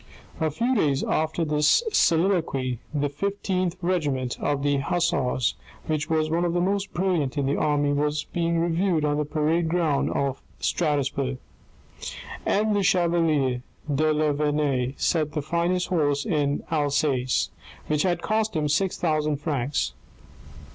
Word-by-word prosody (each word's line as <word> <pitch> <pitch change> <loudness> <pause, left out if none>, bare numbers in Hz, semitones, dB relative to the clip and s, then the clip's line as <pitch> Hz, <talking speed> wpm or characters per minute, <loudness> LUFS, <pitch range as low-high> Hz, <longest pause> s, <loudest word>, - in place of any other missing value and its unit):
A 160 -1 +1
few 235 - 0
days 145 - +1
after 160 +1 0
this 150 - +3
soliloquy 160 - +2
the 145 -1 0
Fifteenth 185 +3 -2
Regiment 145 -8 0
of 145 -1 0
Hussars, 140 -3 +1 0.3
which 155 -2 -2
was 155 -1 +2
one 165 +2 0
of 175 -1 0
the 175 - +1
most 195 +2 0
brilliant 170 -7 0
in 140 - +1
the 140 +2 +1
army, 145 -1 +1
was 150 +1 0
being 170 -1 -1
reviewed 170 -1 +1
on 145 0 +1
the 150 - 0
parade 160 +3 0
ground 160 -4 +1
of 140 -1 -1 0.2
Strasbourg. 140 -4 0 1.1
M. 215 +1 +2
the 205 - +2
chevalier 165 -8 +2 0.3
de 155 +3 +2
La 155 0 +2
Vernaye 145 -3 0
sat 155 -3 0
the 150 - -1
finest 170 +3 0
horse 145 -5 +1
in 145 -2 0
Alsace, 145 -4 +1 0.3
which 150 -1 0
had 175 -2 0
cost 220 -1 0
him 150 -1 +1
six 165 +6 +1
thousand 155 -3 +1
francs. 140 - -1
155 Hz, 140 wpm, -25 LUFS, 145-175 Hz, 1.1 s, this